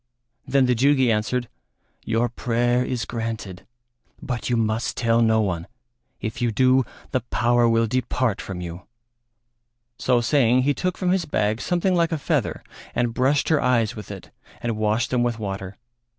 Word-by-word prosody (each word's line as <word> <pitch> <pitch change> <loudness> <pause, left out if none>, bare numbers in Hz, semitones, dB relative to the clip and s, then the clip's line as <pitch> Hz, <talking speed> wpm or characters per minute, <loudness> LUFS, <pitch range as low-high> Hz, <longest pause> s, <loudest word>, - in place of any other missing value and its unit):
Then 135 0 +3
the 125 - +3
Jugi 130 0 +3
answered, 115 +3 0 0.6
"Your 115 +2 +1
prayer 120 +1 0
is 125 -2 -2
granted, 110 -5 -5 0.5
but 125 -1 -4
you 120 - +2
must 110 +1 -1
tell 115 -1 +2
no 110 -1 +3
one; 90 -5 -2 0.5
if 110 +2 -5
you 120 -1 +1
do, 130 +3 +4 0.3
the - - +1
power 120 - +2
will 115 0 +3
depart 125 -1 -1
from 95 -2 -6
you." 85 +1 -8 1.1
So 125 -2 +2
saying 125 0 +3
he 145 +2 +2
took 180 +6 -2
from 180 -1 0
his 185 -2 +1
bag 110 -6 0
something 180 +1 +1
like 170 -2 +2
a 160 - 0
feather 145 - -1 0.3
and 120 -1 0
brushed 130 +3 +1
her 155 -3 +3
eyes 120 -3 +2
with 105 -4 -9
it - - -9 0.3
and 115 -2 -2
washed 110 +2 0
them 125 -1 +2
with 120 -2 0
water. 95 -2 -5
120 Hz, 165 wpm, -23 LUFS, 110-130 Hz, 1.1 s, do